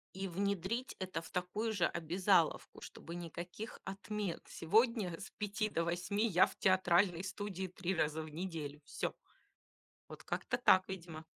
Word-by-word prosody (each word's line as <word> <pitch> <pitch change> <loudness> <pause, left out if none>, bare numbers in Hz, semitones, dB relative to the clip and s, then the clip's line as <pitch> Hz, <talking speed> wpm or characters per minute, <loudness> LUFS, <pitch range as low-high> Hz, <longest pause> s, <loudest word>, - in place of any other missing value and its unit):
И 195 0 -2
внедрить 200 +6 -1
это 185 -3 -3
в - - -11
такую 205 +5 -1
же 175 -4 +3
обязаловку, 175 0 +2
чтобы 170 - -8
никаких 175 +5 -6
отмен. 200 -1 -3
Сегодня 210 -1 +2
с 195 - -8
5 215 +1 -1
до 165 - 0
8 180 +6 0
я 180 -2 +6
в - - -9
театральной 185 -1 +4
студии 195 0 -3
3 185 +1 -2
раза 155 0 +1
в 155 - -7
неделю. 155 -3 -4
Всё. - - -3 0.9
Вот - - -10
как-то 245 - -1
так, 190 -6 +6
видимо. 170 -4 -6
185 Hz, 150 wpm, -36 LUFS, 170-200 Hz, 0.9 s, я